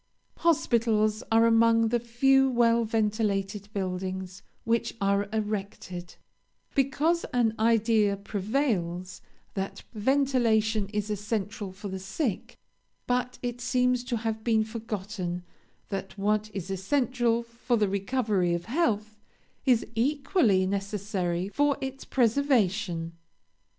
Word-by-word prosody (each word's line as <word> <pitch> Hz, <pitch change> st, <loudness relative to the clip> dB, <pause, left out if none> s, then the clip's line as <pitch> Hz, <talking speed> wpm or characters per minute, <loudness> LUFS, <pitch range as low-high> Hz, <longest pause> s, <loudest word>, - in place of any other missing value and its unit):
Hospitals 225 Hz, -9 st, +2 dB
are 225 Hz, +1 st, +5 dB
among 230 Hz, 0 st, +4 dB
the 240 Hz, +1 st, +2 dB
few 270 Hz, +3 st, +3 dB
well 235 Hz, -1 st, +3 dB
ventilated 210 Hz, -2 st, -1 dB
buildings 185 Hz, -1 st, -4 dB, 0.2 s
which 230 Hz, 0 st, 0 dB
are 200 Hz, 0 st, +1 dB
erected, 200 Hz, -4 st, -4 dB, 0.6 s
because 290 Hz, +5 st, +1 dB
an 235 Hz, -3 st, +2 dB
idea 220 Hz, -2 st, +3 dB
prevails 195 Hz, -4 st, -2 dB, 0.3 s
that 195 Hz, 0 st, -4 dB
ventilation 225 Hz, -3 st, +2 dB
is 210 Hz, 0 st, -2 dB
essential 210 Hz, 0 st, -3 dB
for 195 Hz, +2 st, -8 dB
the 190 Hz, -1 st, -5 dB
sick, 195 Hz, -, -3 dB, 0.5 s
but 250 Hz, 0 st, -1 dB
it 245 Hz, 0 st, -3 dB
seems 250 Hz, 0 st, +1 dB
to 245 Hz, -2 st, -1 dB
have 220 Hz, 0 st, -3 dB
been 220 Hz, -2 st, +3 dB
forgotten 210 Hz, -5 st, -4 dB, 0.5 s
that 195 Hz, 0 st, -5 dB
what 210 Hz, +1 st, +1 dB
is 195 Hz, -1 st, -5 dB
essential 240 Hz, +3 st, +1 dB
for 235 Hz, +1 st, -1 dB
the 210 Hz, -2 st, +2 dB
recovery 200 Hz, -3 st, 0 dB
of 170 Hz, -, -5 dB
health 215 Hz, -6 st, 0 dB, 0.5 s
is 245 Hz, -3 st, +4 dB
equally 250 Hz, -, +2 dB
necessary 195 Hz, -2 st, -2 dB
for 290 Hz, +4 st, +2 dB
its 265 Hz, 0 st, -5 dB
preservation. 215 Hz, -, +1 dB
220 Hz, 110 wpm, -28 LUFS, 195-240 Hz, 0.6 s, are